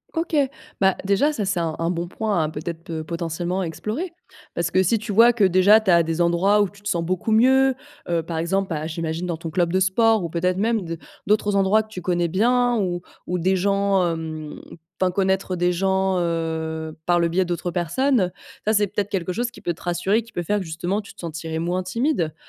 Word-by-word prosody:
OK, 330 0 -1 0.5
bah 190 -1 +4
déjà 200 +10 +3
ça 215 -8 -2
c'est 195 -2 0
un 165 -2 -1
un 165 +1 0
bon 175 0 -3
point, 210 +1 -1
hein, 155 - 0
peut-être, 160 +2 -6
peut 160 -2 -5
potentiellement 170 +2 -3
à - - -1
explorer. 225 - -4 0.4
Parce 170 0 -1
que 185 - +4
si 190 +5 +2
tu 215 +1 -5
vois 230 +4 +6
que 225 -3 +1
déjà 190 +3 +6
tu 215 -4 +1
as 170 -1 +6
des 165 0 -2
endroits 180 +5 +3
où 205 - +1
tu 200 +1 -19
te 205 - -4
sens 170 -3 0
beaucoup 185 +5 -1
mieux, 260 +4 +4 0.3
heu, 170 -1 +1
par 165 0 -5
exemple, 190 +4 0
bah, 155 -2 -3
j'imagine 165 +1 -3
dans 170 -2 -2
ton 165 0 -6
club 170 +1 +1
de 185 - +2
sport 215 +2 +3
ou 170 - -3
peut-être 180 +2 0
même 220 +1 +1
de 165 -1 -5 0.3
d'autres 205 0 +2
endroits 200 +2 +3
que 215 - -21
tu 185 -4 -7
connais 175 -1 0
bien 240 +7 +2
ou 175 -3 -1 0.3
ou 180 - -1
des 185 +2 +2
gens, 195 0 +2
hem 155 -2 -6 0.4
enfin 185 -1 +3
connaître 190 0 0
des 175 0 +1
gens, 190 +1 +1
heu, 160 -2 -2
par 175 0 +3
le 170 - +2
biais 185 +3 +1
d'autres 175 0 -3
personnes, 185 - +1 0.4
ça 215 - +4
c'est 205 -1 +3
peut-être 200 +1 -2
quelque 185 -3 -2
chose 240 +6 -1
qui - - -14
peut 175 - -1
te - - -18
rassurer, 180 +5 +1
qui 230 0 -19
peut 175 - -2
faire 205 +5 0
que, 190 - -5
justement, 175 +5 -2
tu 200 - -13
te - - -12
sentirais 160 -1 -5
moins 175 +2 -1
timide. 185 - -1
185 Hz, 230 wpm, -23 LUFS, 170-205 Hz, 0.5 s, vois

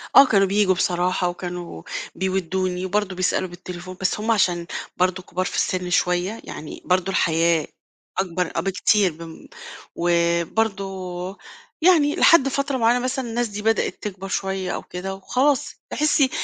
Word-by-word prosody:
آه، 275 - +10
كانوا 195 -6 +3
بييجوا 200 -1 +3
بصراحة، 180 0 +1
وكانوا 175 - -6 0.3
بيوِّدوني، 185 -1 -1
وبرضه 195 0 -1
بيسألوا 185 0 0
بالتليفون، 180 +1 -9
بس 190 +2 0
هُم 225 +2 0
عشان 180 -5 +2 0.3
برضه 185 0 +1
كبار 185 +1 -3
في - - -4
السن 180 -1 0
شوية، 180 +4 +1
يعني 155 - -8
برضه 185 +1 +1
الحياة 165 -2 +2 0.5
أكبر 180 -2 -1
آه، - - +3
بكتير 195 0 +2
بم 165 0 -11 0.5
وبرضه 180 +2 -1 0.4
يعني 315 -4 +5
لحد 305 -5 +6
فترة 275 0 -1
معينة 240 +1 +3
مثلًا، 255 -1 -2
الناس 240 +1 0
دي 205 0 -6
بدأت 225 +1 +1
تكبر 195 -2 -5
شوية 190 -2 -2
أو - - -5
كده، 190 +2 -5
وخلاص 270 +8 +1 0.2
تحسّي 295 -2 +2
185 Hz, 140 wpm, -23 LUFS, 180-215 Hz, 0.5 s, آه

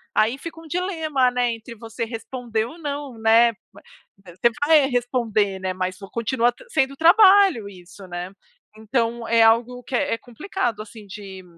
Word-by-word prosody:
Aí 225 +4 +2
fica 330 +1 -8
um 325 - -13
dilema, 315 -6 0
né, 245 -1 0
entre 230 +1 -10
você 225 0 -6
responder 230 -1 -4
ou 310 +9 -11
não, 285 -5 -5
né? 225 +1 +5 0.2
Mas - - -17 0.6
você 235 - +5 0.2
vai 300 -3 +5
responder, 230 -6 0
né, 185 0 -3
mas 185 0 -3
continua 235 +1 +1 0.2
sendo 275 - 0
trabalho 375 - +5
isso, 185 0 -14
né, 175 +1 -6 0.5
então 230 +1 -2
é 230 0 +3
algo 240 +2 +2
que 255 - -5
é 285 +3 0
é - - -1
complicado 240 - -4
assim 215 0 -12
de, 190 -1 -10
235 Hz, 160 wpm, -22 LUFS, 220-275 Hz, 0.6 s, né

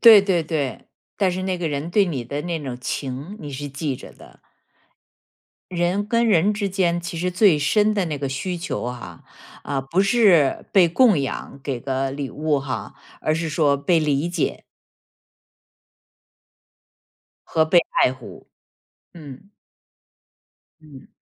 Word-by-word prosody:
对 225 -3 +10
对 185 -4 +1
对， 150 -5 -3 0.3
但 195 -3 +2
是 185 +1 -3
那 185 -1 -2
个 175 - -2
人 145 +3 -3
对 205 +3 +4
你 140 -10 -3
的 145 +5 -4
那 170 -1 -3
种 130 -3 -5
情， 135 +9 -5
你 150 -3 -7
是 145 +2 -5
记 140 0 -3
着 - - -12
的。 - - -17 1.3
人 180 +3 0
跟 230 +2 +2
人 205 0 +3
之 205 -1 -1
间 180 -3 +1
其 170 -1 -5
实 180 +2 -1
最 180 -3 +4
深 210 +9 +2
的 200 -4 0
那 155 -3 -3
个 140 0 -3
需 135 +7 -3
求 165 -8 -4
哈， 120 -9 -8 0.4
啊， 140 - -2
不 160 +8 0
是 195 - +4
被 185 -4 +6
供 200 - +4
养 135 0 -5
给 135 -3 -3
个 135 +1 -2
礼 140 0 -5
物 150 0 0
哈， 135 -1 -5 0.3
而 155 - +1
是 165 0 -2
说 150 -2 +2
被 165 +5 +2
理 150 0 0
解。 175 - -2 2.9
和 160 - +3
被 165 +3 +5 0.3
爱 125 - +3
护， 130 - -12 0.7
嗯。 155 +2 -12 1.3
嗯。 150 -4 -15
160 Hz, 160 characters per minute, -22 LUFS, 140-185 Hz, 2.9 s, 对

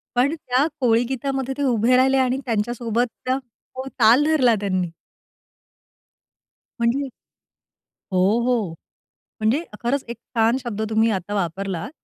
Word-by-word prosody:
पण 270 +6 +2
त्या 260 -3 +1
कोळी 235 -2 +3
गीतामध्ये 270 0 -2
ते 285 - -1
उभे 235 +2 +3
राहिले 265 +1 +4
आणि 260 0 +2
त्यांच्यासोबतचं 240 +2 -1
तो 260 +1 -11
ताल 235 +7 +6
धरला 265 -7 +4
त्यांनी. 185 -3 -1 1.9
म्हणजे 265 +4 +1 1.0
हो, 185 - +1 0.3
हो. 225 -9 0 0.7
म्हणजे 230 +9 +2 0.2
खरंच, 260 +3 0
एक 235 - -5
छान 230 0 +1
शब्द 220 -3 -4
तुम्ही 220 +1 +3
आता 200 0 -3
वापरलात, 190 0 -3
240 Hz, 120 wpm, -22 LUFS, 220-260 Hz, 1.9 s, ताल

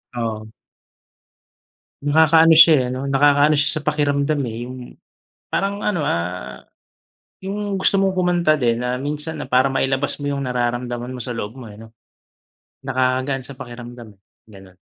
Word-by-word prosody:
Oo. 110 -2 -4 1.5
Nakakaano 160 +2 +5
siya, 160 0 +9
eh, - - -1
ano 130 +2 -4
nakakaano 145 +2 +3
siya 150 +1 +2
sa 150 - -7
pakiramdam, 145 -1 0
eh, 115 +2 -6
yung 125 0 -10 0.6
parang 200 +1 -2
ano, 195 -6 0
ah, 85 - -4 0.7
yung 200 +1 -4
gusto 195 +1 +3
mong 190 -1 0
kumanta 175 -4 +2
din 120 -2 0
na 125 +1 -2
minsan 150 +4 -4
na - - -6
para 130 +2 +2
mailabas 135 +1 -1
mo 145 - -6
yung 140 -1 -2
nararamdaman 120 0 -3
mo 125 - -6
sa 125 - -6
loob 115 -2 -5
mo, 125 -4 -11
eh, 105 - -13
ano. 110 0 -14 0.9
Nakakagaan 130 +1 -1
sa 130 +1 -9
pakiramdam, 120 -3 -10
eh. 95 - -35 0.3
Gano'n. 95 -4 -16
135 Hz, 155 wpm, -20 LUFS, 120-150 Hz, 1.5 s, siya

